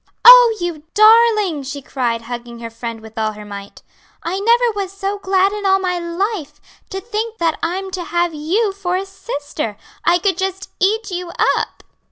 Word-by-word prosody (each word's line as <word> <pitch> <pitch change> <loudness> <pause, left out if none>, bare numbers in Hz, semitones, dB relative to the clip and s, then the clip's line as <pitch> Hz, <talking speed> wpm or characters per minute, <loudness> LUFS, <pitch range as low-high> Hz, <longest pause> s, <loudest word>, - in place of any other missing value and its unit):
"Oh, - - +10
you 345 -3 -3
darling!" 430 -6 +5
she 280 +1 -6
cried, 240 -4 -2
hugging 240 0 -7
her 230 -1 -7
friend 230 0 -6
with 220 +1 -9
all 215 -1 0
her 210 0 -10
might. 200 -1 -10 0.4
"I 365 +3 -2
never 470 +3 +3
was 390 -2 -3
so 395 +1 -4
glad 385 0 +2
in 415 -1 -5
all 385 -1 +4
my 365 -2 -1
life! 340 -3 -3 0.3
To 385 - -4
think 445 +2 -4
that 330 -4 0
I'm 380 +3 -3
to 360 -1 -4
have 345 0 0
you 380 +8 0
for 370 -2 -2
a 385 - -3
sister! 290 - -5 0.3
I 345 - +4
could 375 0 0
just 385 0 -3
eat 420 +2 +1
you 360 -1 -4 0.3
up!" - - -4
365 Hz, 185 wpm, -18 LUFS, 285-400 Hz, 0.4 s, Oh